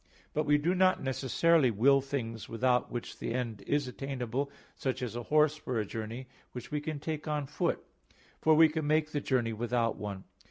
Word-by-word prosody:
But 155 0 0
we 145 0 +5
do 165 +5 +1
not 185 -2 +3
necessarily 135 +3 +3
will 135 +6 +4
things 120 -5 -4
without 125 +1 +1
which 120 - -5
the 115 - -3
end 120 -4 -3
is 145 -2 +1
attainable, 135 0 -3 0.3
such 130 -1 -2
as 120 -2 -4
a 120 - -3
horse 150 0 +4
for 130 -5 -3
a 105 - -1
journey 110 +5 -5 0.3
which 125 +2 -8
we 150 0 -1
can 150 0 -4
take 155 +1 -4
on 150 -2 -1
foot, - - -1 0.6
for 155 0 +5
we 160 +1 +8
can 155 -1 -3
make 155 0 +2
the 145 - -1
journey 120 -5 0
without 115 0 0
one. 100 -2 -5
135 Hz, 195 wpm, -31 LUFS, 120-150 Hz, 0.6 s, we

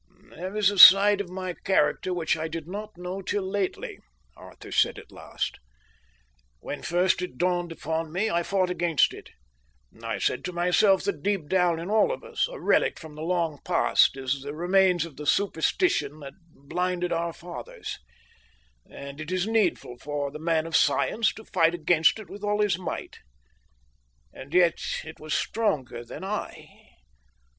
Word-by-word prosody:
"There 185 +5 -6
is 205 -1 +4
a 200 - -3
side 200 +2 +9
of 190 - -7
my 185 0 -5
character 175 0 0
which 170 -3 0
I 160 0 -3
did 160 -1 -6
not 210 +2 -7
know 180 +2 -5
till 195 0 -2
lately," 195 -1 -3 0.4
Arthur - - -13
said - - +2
at - - -12
last. - - -5 1.0
"When 145 - -6
first 180 +1 +1
it 180 -9 -6
dawned 175 0 0
upon 160 0 -3
me, 190 +6 0
I 170 -5 +1
fought 185 0 0
against 170 -4 +2
it. - - -12 0.7
I - - -3
said - - -1
to 180 - -4
myself 180 +3 +3
that 200 - -2
deep 195 -6 -1
down 175 -1 +2
in 175 +5 -5
all 220 - +3
of - - -5
us, - - -1
a - - -8
relic - - +2
from 160 -2 -11
the 155 - -9
long 165 -3 -1
past, - - +3
is 135 +1 -2
the 145 +2 -7
remains 180 0 +2
of 165 -5 -12
the 150 0 -7
superstition 165 - +1
that 140 -1 -9 0.2
blinded 180 +5 -2
our 170 0 -1
fathers; 175 +1 -8 0.9
and 140 +2 -9
it 155 +3 -6
is 185 0 0
needful 205 - 0
for 145 0 -3
the 150 - -8
man 160 0 0
of 165 -1 -3
science 225 0 +2
to 220 - -11
fight 165 +1 +2
against 165 +1 +3
it 215 -3 -10
with 200 +4 -11
all 210 0 +1
his 205 -4 +2
might. 180 - -6 1.1
And 135 - -11
yet 175 -1 +3 0.2
it 160 0 -11
was 155 0 -3
stronger 155 - -1
than 120 - -9
I. 205 +2 -5
175 Hz, 170 wpm, -26 LUFS, 160-195 Hz, 1.1 s, side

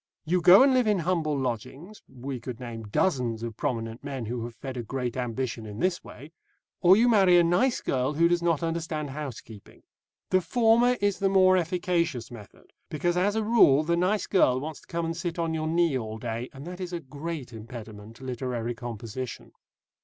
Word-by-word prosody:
You 175 +3 +1
go 185 +8 +8
and 270 -1 +4
live 250 -3 +3
in 210 -2 +3
humble 165 -4 0
lodgings, 135 - -5
we 130 0 -6
could 120 0 -7
name 115 -3 -7
dozens 120 - 0
of 115 -2 -5
prominent 115 -3 -3
men 135 -4 -5
who 120 +1 -4
have 120 -1 -9
fed 135 -2 -7
a 125 - -3
great 125 +1 -4
ambition 120 -2 -3
in 105 -1 -8
this 185 -1 0
way, 145 +5 -12 0.5
or 185 +2 +7
you 235 +2 +4
marry 195 -6 +5
a 175 - +6
nice 180 +10 +2
girl 130 +2 -1
who 165 +3 +4
does 175 0 +1
not 170 -2 +1
understand 165 -3 -3
housekeeping. 130 -7 -9 0.5
The 185 0 +4
former 240 +4 +3
is 205 -1 +1
the 195 - +2
more 185 -1 +5
efficacious 170 - -1
method, 110 -4 -14 0.2
because, 175 +3 -1
as 200 +4 +1
a 220 - 0
rule, 205 -11 +5
the 170 +2 +1
nice 185 +3 +1
girl 130 -9 +3
wants 155 +2 -6
to - - -22
come 170 -1 -2
and 165 0 -3
sit 175 0 -4
on 165 -1 -1
your 155 0 -2
knee 165 -2 +2
all 110 -3 -4
day, 115 +1 -4
and 135 +2 -11
that 180 +1 -8
is 180 -1 -5
a 175 - -2
great 145 -2 -7
impediment 110 -1 -10
to 130 - -14
literary 125 -2 -3
composition. 120 +1 -7
150 Hz, 200 wpm, -27 LUFS, 120-180 Hz, 0.5 s, go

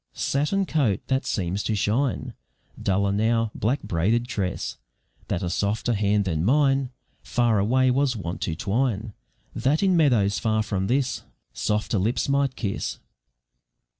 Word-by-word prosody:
Satin 150 +8 0
coat 135 - +1
that 130 0 0
seems 95 +1 -1
to 110 - -1
shine 120 +6 0 0.5
Duller 100 +1 +1
now, 110 +2 +1
black 125 +7 -1
braided 110 +8 0
tress, 100 -6 -3 0.5
That 85 - -2
a 90 - -1
softer 105 +5 0
hand 105 -1 +1
than 80 -4 -1
mine 135 +3 +3 0.3
Far 120 -4 +1
away 130 +5 +3
was 135 0 +1
wont 90 -5 -5
to 80 - -1
twine, 110 +2 -1 0.4
That 150 +7 +1
in 190 -2 +4
meadows 120 -11 +3
far 110 -1 +1
from 95 -2 -2
this 125 0 0 0.3
Softer 105 - 0
lips 110 +6 0
might 140 -1 +1
kiss. 100 -4 -3
110 Hz, 140 wpm, -25 LUFS, 100-130 Hz, 0.5 s, in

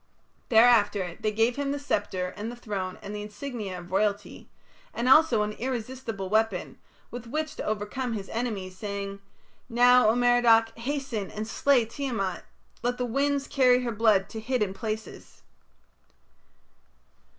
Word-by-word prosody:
Thereafter 220 -6 +4
they 215 - 0
gave 225 +4 +1
him 280 -1 -1
the 285 - -2
sceptre 185 -10 -2
and 220 +3 -5
the - - -8
throne 195 -6 -5
and 205 - -6
the 210 - -4
insignia 210 -2 -6
of 175 0 -11
royalty, 205 +1 -1 0.5
and 235 - -1
also 260 -6 +6
an 210 - -2
irresistible 235 -3 -4
weapon 215 -2 0 0.3
with 245 -1 -7
which 310 +4 -3
to - - -4
overcome 215 +4 -3
his 200 -3 -5
enemies, 210 -6 -3
saying: 200 0 -5 0.5
"Now, 245 0 +5
O 225 - +3
Merodach, 240 -2 +4
hasten 240 -5 -3
and 215 +1 -5
slay 255 0 +3
Tiamat. 225 -7 -3 0.4
Let 245 +1 -1
the 250 - -1
winds 275 +3 0
carry 250 -2 +3
her 240 - -2
blood 210 -3 +3
to 220 - -6
hidden 220 -4 -1
places." 220 +2 -7
225 Hz, 145 wpm, -27 LUFS, 205-250 Hz, 0.5 s, also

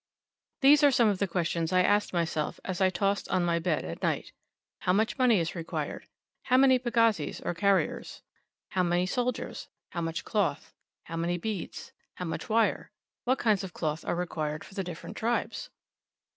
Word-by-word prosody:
These 290 +2 +7
are 290 - +8
some 240 -4 +4
of 200 -3 -1
the 200 - +1
questions 170 -2 -1
I 185 0 +4
asked 205 +2 +2
myself, 165 -3 -1
as 185 0 -3
I 190 - +5
tossed 200 +2 0
on 180 - +2
my 170 -1 +1
bed 165 - 0
at 80 +1 -6
night: - - -1 0.5
"How 180 - +1
much 220 +6 +1
money 245 -6 +5
is 165 -1 -2
required?" 170 -2 -4 0.4
"How 255 -1 +4
many 260 -1 +6
pagazis, 230 - +1
or - - -2
carriers? 195 +2 0 0.5
"How 185 - 0
many 175 0 +2
soldiers?" 245 +5 -2 0.2
"How 170 - -3
much 165 0 -3
cloth?" 180 -9 -1 0.3
"How 165 - -6
many 170 +1 0
beads?" 200 0 -5 0.2
"How 180 - -5
much 165 - -5
wire?" 225 +1 +2 0.4
"What 255 +2 +2
kinds 210 -4 +2
of 185 -2 -7
cloth 155 0 -2
are - - -1
required 155 -3 -3
for - - -14
the 195 -1 -2
different 175 -2 -8
tribes?" 240 - -1
185 Hz, 180 wpm, -29 LUFS, 170-225 Hz, 0.5 s, are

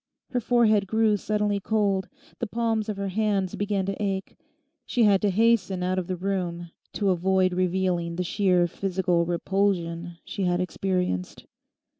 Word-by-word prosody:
Her 250 - +1
forehead 220 -4 +3
grew 220 +1 +3
suddenly 210 0 0
cold, 200 -2 0 0.3
the 235 - -2
palms 225 -1 -1
of 210 - -3
her 200 0 -2
hands 200 -2 0
began 200 -2 -1
to 195 +1 -4
ache, 195 -2 -2 0.5
she 245 - +1
had 200 -3 +4
to 205 - +2
hasten 195 -3 +2
out 185 +1 0
of 180 - -5
the 185 - -2
room 175 -2 -3 0.2
to 200 -2 +1
avoid 185 +1 +2
revealing 180 -2 0
the 180 - -1
sheer 180 -1 +2
physical 180 -1 0
repulsion 175 -2 -1
she 195 - -3
had 175 0 +1
experienced. 180 - -2
190 Hz, 155 wpm, -26 LUFS, 180-205 Hz, 0.5 s, had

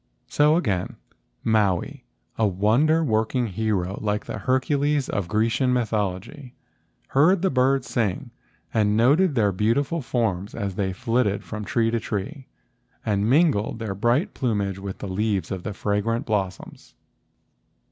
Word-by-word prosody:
So, 150 +1 +3
again, 100 - -1 0.5
Maui, 110 +5 0 0.3
a 110 - +2
wonder 115 - +2
working 115 0 0
hero 100 -2 -2
like 105 0 -1
the - - -5
Hercules 140 +2 +1
of 100 -3 -2
Grecian 115 +5 +1
mythology, 110 +3 -3 0.5
heard 165 +7 +3
the 190 - +2
birds 130 -1 +2
sing, 115 +1 -2 0.4
and 105 -1 +2
noted 145 +8 +4
their 105 -4 +3
beautiful 125 - 0
forms 110 -7 -2
as 100 -4 -3
they 95 0 -1
flitted 115 0 0
from 105 -1 -6
tree 115 +2 +1
to 115 - 0
tree 120 +7 -5 0.6
and 105 0 +1
mingled 135 -8 +2
their 110 -3 -4
bright 120 - +1
plumage 100 -7 -1
with 95 -1 -6
the - - -6
leaves 95 -2 -1
of 95 -2 -3
the 105 - -5
fragrant 105 +5 -1
blossoms. 95 -4 -4
110 Hz, 135 wpm, -24 LUFS, 100-130 Hz, 0.6 s, noted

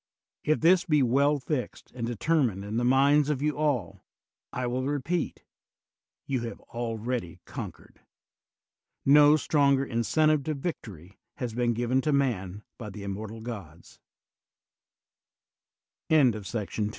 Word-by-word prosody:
If 155 +1 +1
this 175 +2 +5
be 150 -5 +3
well 140 +4 +3
fixed 130 -3 -4
and 115 -2 -4
determined 120 - 0
in 105 +2 -3
the 120 - +1
minds 140 +3 +4
of 145 -2 -1
you 150 0 +1
all, 145 - -1 0.5
I 125 - -3
will 125 +1 -1
repeat, 145 +4 -2 0.8
you 130 -3 -1
have 115 0 -6
already 115 -5 -4
con - - -6
quered; - - -22 1.1
no 145 +2 +7
stronger 140 -2 +2
incentive 150 +6 +2
to 155 - -1
victory 105 - -7 0.2
has 125 -5 -4
been 120 0 +1
given 120 +3 +1
to 150 - 0
man 105 -8 -1 0.2
by 115 -4 -6
fhe 100 0 -8
inunort 110 -6 -8
130 Hz, 120 wpm, -28 LUFS, 115-145 Hz, 1.1 s, no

